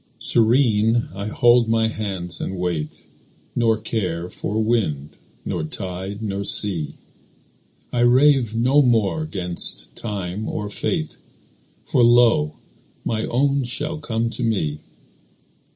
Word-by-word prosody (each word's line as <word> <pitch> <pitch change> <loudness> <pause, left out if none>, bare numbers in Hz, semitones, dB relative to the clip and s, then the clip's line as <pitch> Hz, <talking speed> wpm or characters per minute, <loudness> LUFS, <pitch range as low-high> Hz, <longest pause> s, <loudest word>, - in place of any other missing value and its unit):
Serene 115 -1 +3
I 100 +2 -5
fold 120 +1 +4
my 115 0 +2
hands 95 -5 -4
and 95 - -4
wait, 85 -4 -3 0.5
Nor 115 -2 +2
care 95 -6 -3
for 105 - -4
wind, 95 -11 0 0.3
nor - - -2
tide, 95 +5 -5
nor 100 -1 -3
sea. 95 -6 -1 1.0
I 120 - 0
rave 125 -1 +4
no 130 +6 +4
more 120 +4 +1
'gainst 90 - -2
time 100 -1 -4
or 105 -1 -4
fate, 160 - -2 0.7
For - - +2
lo! 115 -11 +4 0.5
my 110 -1 -1
own 140 +2 +1
shall 150 +6 0
come 115 -4 -2
to 125 - -6
me. 85 -10 -1
110 Hz, 120 wpm, -22 LUFS, 95-120 Hz, 1.0 s, fold